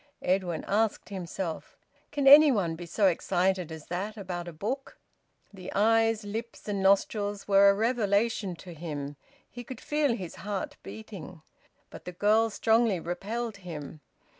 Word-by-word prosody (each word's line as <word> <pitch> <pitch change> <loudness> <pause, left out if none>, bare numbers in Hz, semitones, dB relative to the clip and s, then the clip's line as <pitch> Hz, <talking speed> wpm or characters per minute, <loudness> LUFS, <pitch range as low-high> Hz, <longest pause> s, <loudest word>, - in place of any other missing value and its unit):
Edwin 180 -2 0
asked 215 +1 0
himself, 185 -3 -5 0.3
"Can 285 -2 -1
any 290 +2 +9
one 180 -9 0
be 170 +1 -8
so 205 +4 +1
excited 180 -1 +1
as 160 -2 -8
that 200 +5 -4
about 180 -3 -5
a - - -5
book?" 230 - -5 0.6
The 185 -2 -8
eyes, 225 +1 +3
lips, 220 +3 -6
and 200 -2 -1
nostrils 200 +1 +1
were 200 0 +6
a 200 - +4
revelation 215 -3 +1
to 175 +1 -11
him. 145 -3 -6 0.3
He 245 - -9
could 245 0 -9
feel 295 -5 +1
his 185 -6 -7
heart 210 +9 -4
beating. 185 -7 -10 0.5
But - - -11
the 180 - -6
girl 215 +5 +3
strongly 225 -2 +2
repelled 205 +7 -4
him. 155 -5 -8
200 Hz, 150 wpm, -28 LUFS, 175-225 Hz, 0.6 s, any